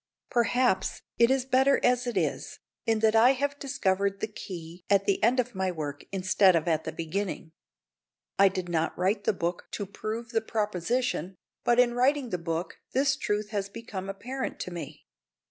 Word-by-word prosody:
Perhaps 235 -4 +1 0.2
it 235 0 +6
is 265 -1 +2
better 265 +1 +4
as 245 0 +2
it 240 - -2
is, - - -1 0.3
in 225 -1 +2
that 220 0 +4
I 240 +4 +7
have 285 +2 -2
discovered 200 -7 0
the - - 0
key 175 -4 -9
at 200 -1 +4
the 200 - +1
end 245 +3 +4
of 250 0 0
my 190 -1 -1
work 145 -4 -5
instead 190 0 +4
of 165 0 0
at 160 -2 +1
the - - -3
beginning. 170 0 -4 0.9
I 200 - +8
did 185 -2 -2
not 165 -2 -1
write 200 +3 0
the - - +4
book 175 -1 -3
to 205 - -3
prove 220 +4 -5
the 225 -2 +1
proposition, 210 -2 -1 0.3
but 240 0 +3
in 245 -1 +5
writing 255 0 +2
the 180 - -1
book 165 0 -3
this 275 +1 +3
truth 210 -4 -2
has 200 -2 -2
become 200 -3 -7
apparent 255 +7 -4
to 180 - -5
me. 175 -1 -8
205 Hz, 180 wpm, -28 LUFS, 185-245 Hz, 0.9 s, I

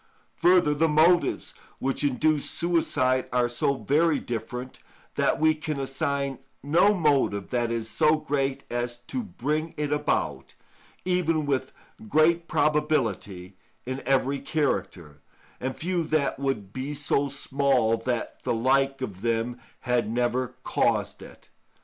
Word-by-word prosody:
Further, 175 -4 +4
the 160 +3 +2
motives 160 +3 +3 0.2
which 135 +2 -2
induce 145 +2 +1
suicide 145 -7 0
are 125 -1 +2
so 120 +3 0
very 150 +3 +2
different, 125 +2 -6 0.3
that - - +1
we 155 0 +4
can 155 -2 -4
assign 140 -1 -2 0.2
no 175 +8 +4
motive 140 - +1
that 120 -2 0
is 115 -1 -2
so 155 +6 +3
great 135 -2 -2
as 120 0 -2
to 120 - -5
bring 155 - -3
it 150 -1 -2
about, 150 0 -1 0.5
even 165 -4 +1
with 135 -2 -1 0.4
great 170 -1 +3
probability, 130 - 0 0.3
in 130 +2 -4
every 135 +1 +2
character, 95 - -2 0.4
and 130 +1 -4
few 175 0 -1
that 150 -3 0
would 110 -8 -2
be 135 +3 -4
so 140 0 0
small 135 -4 +1
that 120 +1 -3
the - - -1
like 135 +3 +2
of 95 -6 -6
them 115 +1 -1 0.2
had 125 -3 0
never 120 +2 -1
caused - - 0
it. - - -14
135 Hz, 130 wpm, -26 LUFS, 120-155 Hz, 0.5 s, Further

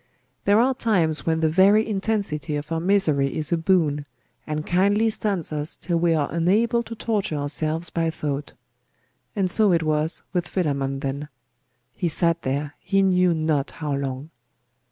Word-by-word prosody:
There 205 +2 +5
are 260 +3 +3
times 175 -12 0
when 160 0 +1
the 160 - +3
very 195 +7 +4
intensity 195 -9 -2
of 150 +2 -5
our 165 - 0
misery 165 -7 +1
is 155 +1 -3
a - - +4
boon, 160 -4 +1 0.4
and 155 0 -3
kindly 205 +5 +2
stuns 195 -8 -1
us 150 +1 -2
till 170 0 -2
we 165 -1 +2
are 150 -2 +1
unable 210 - +2
to 230 0 -8
torture 210 -8 -2
ourselves 155 +3 -1
by 165 -1 0
thought. 145 -3 -4 0.8
And 195 -3 +1
so 205 +2 +3
it 165 -2 +2
was 155 +1 0
with 175 -2 -1
Philammon 140 -7 -1
then. 140 +1 -3 0.7
He 180 - -2
sat 170 +1 +1
there, 140 +2 -2
he 195 0 +1
knew 180 -2 +3
not 155 -3 0
how 150 -2 -3
long. 140 +2 -4
165 Hz, 165 wpm, -23 LUFS, 150-195 Hz, 0.8 s, There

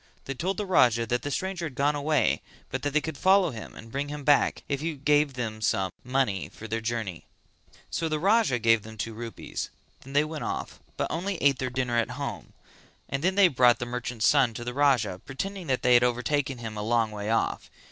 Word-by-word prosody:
They 135 - -3
told 185 +8 -2
the 210 - -2
Raja 120 - +4
that 120 +2 -1
the 145 - -4
stranger 180 +2 -2
had 135 - -11
gone 145 +3 +2
away 145 0 +1 0.3
but - - -2
that 145 - -1
they 150 +2 +2
could 150 -3 -6
follow 190 -3 +4
him 110 -2 -9
and 115 0 -11
bring 140 +3 -2
him 145 0 -6
back 145 0 +3
if 140 -1 -2
he 160 0 -2
gave 145 0 +2
them 110 -3 -4
some 95 -4 +1
money 125 -7 0
for 110 - -10
their 115 +1 -2
journey. 110 -7 -4 0.6
So 165 -1 -1
the 155 - 0
Raja 200 - +3
gave 115 -1 +4
them 110 +1 -11
two 115 +2 -4
rupees; 115 +1 -6 0.3
then 135 - -12
they 145 +1 +4
went 155 0 -5
off - - -4 0.2
but - - 0
only 185 +3 -2
ate 140 -4 +3
their 130 - -1
dinner 125 -1 -1
at 115 - 0
home, 140 -4 -5 0.6
and 135 +2 -2
then 185 +1 +2
they 200 -2 +7
brought 125 -5 +4
the 120 - -4
merchant's 120 -2 -1
son 135 -6 +4
to 120 - -5
the 125 +1 -4
Raja, 120 -10 +2
pretending 190 +6 -5
that 130 -2 0
they 125 - +5
had 120 0 +6
overtaken 130 +2 0
him 110 -2 -6
a - - -2
long 115 0 +1
way 105 0 -4
off. 115 - 0
130 Hz, 225 wpm, -27 LUFS, 115-150 Hz, 0.6 s, they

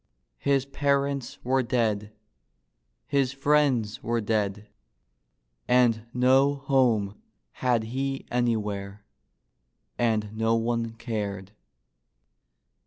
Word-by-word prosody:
His 140 -2 +1
parents 140 -1 -1
were 130 +2 +2
dead, 110 -4 0 0.9
his 140 -2 +1
friends 135 -6 +1
were 115 0 0
dead, 105 -1 -1 1.0
and 120 -3 +3
no 130 +3 +4
home 125 -7 +1 0.3
had 120 -3 0
he 135 +4 -3
an3^where, 105 -4 -1 1.0
and 110 -3 0
no 115 +1 +2
one 115 0 -1
cared. 105 -4 -4
120 Hz, 85 wpm, -26 LUFS, 110-135 Hz, 1.0 s, no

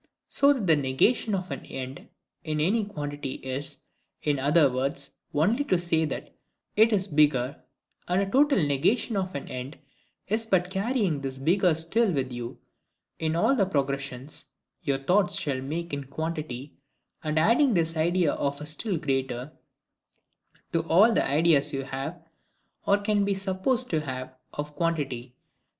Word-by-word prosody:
So 280 0 +4
that 255 -8 0
the 165 -3 +5
negation 150 - +2
of 185 -3 -4
an 135 - -5
end 130 +1 -7 0.4
in 155 -2 -2
any 205 +9 +2
quantity 145 -8 -5
is, 130 +2 -4 0.4
in 145 -2 +1
other 145 +3 +5
words, 135 +2 -2 0.2
only 210 - +2
to 185 - +2
say 170 -2 +1
that 150 - -5 0.4
it 220 +2 +5
is 195 -2 +2
bigger; 145 -4 +2 0.5
and 180 +1 +2
a 200 - +2
total 270 - +3
negation 180 - +1
of 190 -3 -2
an 140 - -5
end 130 +4 -6 0.5
is 220 +3 -1
but 180 -3 +2
carrying 195 - 0
this 135 -1 -4
bigger 175 +4 +3
still 190 +7 +2
with 135 -5 -1
you, 120 -1 -6 0.6
in 160 0 0
all 220 +11 +3
the 200 -7 +2
progressions 140 -3 -2 0.4
your 140 -2 0
thoughts 180 +7 +2
shall 135 -3 -1
make 160 +4 -4
in 140 -1 -3
quantity; 150 -2 -5 0.5
and 155 0 -1
adding 235 - +4
this 165 -1 +1
IDEA 170 0 +2
OF 140 +1 -2
STILL 180 +5 0
GREATER 135 -3 -2 1.2
to 165 - +3
ALL 205 +8 +6
the - - +3
ideas 150 0 +3
you 135 0 -2
have, 135 +5 -5 0.7
or 200 - +5
can 205 0 +1
be 200 0 +1
supposed 195 +7 0
to 160 -2 +1
have, 130 -3 -5 0.2
of 150 0 -6
quantity. 135 -7 -2
160 Hz, 155 wpm, -27 LUFS, 140-195 Hz, 1.2 s, ALL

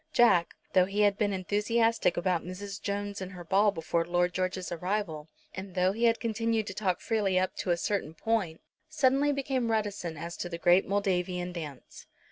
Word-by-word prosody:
Jack, 190 - +4 0.2
though 185 -1 +5
he 200 +2 0
had 205 -1 +4
been 205 -1 0
enthusiastic 210 +2 +1
about 175 -1 +1
Mrs. 195 +2 -7
Jones 200 0 -3
and 190 0 -6
her 180 -1 -8
ball 195 +5 +3
before 165 -2 -1
Lord 175 +1 +1
George's 185 0 -2
arrival, 175 -3 -3 0.2
and 190 -1 -8
though 185 0 +3
he 230 +4 0
had 230 -1 +3
continued 225 -1 0
to 195 - -5
talk 190 -3 -1
freely 205 -5 0
up 185 0 0
to - - -3
a 175 - +3
certain 170 -4 -2
point, 190 -5 -1 0.3
suddenly 285 -1 +3
became 265 -4 -1
reticent 205 -7 -2
as 170 +2 -6
to 175 - -4
the 170 - -4
great 175 +2 +4
Moldavian 180 -3 -1
dance. 150 -6 -8
190 Hz, 185 wpm, -29 LUFS, 175-215 Hz, 0.3 s, though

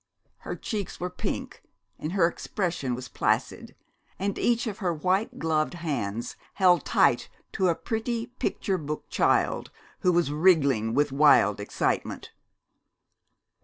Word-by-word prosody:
Her - - -6
cheeks 210 -5 -5
were 180 0 -3
pink - - -5 0.4
and 155 +3 -4
her 190 -4 +4
expression 170 - -2
was 125 +1 -7
placid, - - -1 0.4
and 200 +1 -2
each 235 0 +2
of 215 -3 -4
her 180 -3 0
white 185 +6 0
gloved 160 0 0
hands 120 -10 -3 0.2
held 180 -3 +4
tight - - +3 0.2
to 190 -2 +1
a 170 - +2
pretty 230 +3 -2
picture 220 -6 -2
book 150 0 -5
child - - +1 0.3
who 180 - +3
was 170 -4 +2
wriggling 140 - +3
with 145 -1 +2
wild 135 -8 +5
excitement. 100 - -2
170 Hz, 130 wpm, -27 LUFS, 145-190 Hz, 0.4 s, wild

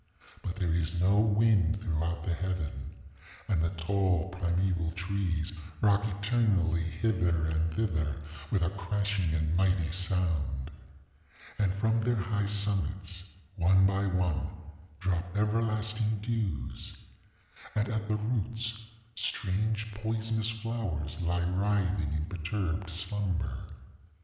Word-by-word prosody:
But 90 - -4
there 90 -5 0
is 85 +1 0
no 95 +3 +4
wind 105 -3 +4
throughout 85 -3 -1
the 85 - 0
heaven. 90 -2 -3 0.6
And 95 -6 +2
the 85 - +2
tall 95 +1 +1
primeval 90 -1 0
trees 90 -1 -1 0.3
rock 100 -1 +4
eternally 100 -4 +2
hither 85 -2 +1
and 80 +1 +1
thither 80 -9 0 0.3
with 95 -4 +2
a 85 - +1
crashing 100 -2 0
and 80 +1 +1
mighty 90 -3 +2
sound. 85 -6 0 0.9
And 100 -3 +3
from 110 +4 +1
their 120 +2 +2
high 105 0 0
summits, 95 -3 -1 0.3
one 95 +2 +5
by 100 +1 +2
one, 90 -3 +1 0.5
drop 90 +1 -1
everlasting 110 0 +1
dews. 105 - -2 0.8
And 105 +1 +2
at 110 -3 -2
the 105 0 +1
roots 115 0 -2 0.3
strange 110 +1 0
poisonous 110 +1 -1
flowers 110 -10 -3
lie 85 0 +1
writhing 95 -3 +1
in 75 0 -1
perturbed 90 +1 -2
slumber. 90 0 -1
95 Hz, 115 wpm, -31 LUFS, 85-105 Hz, 0.9 s, one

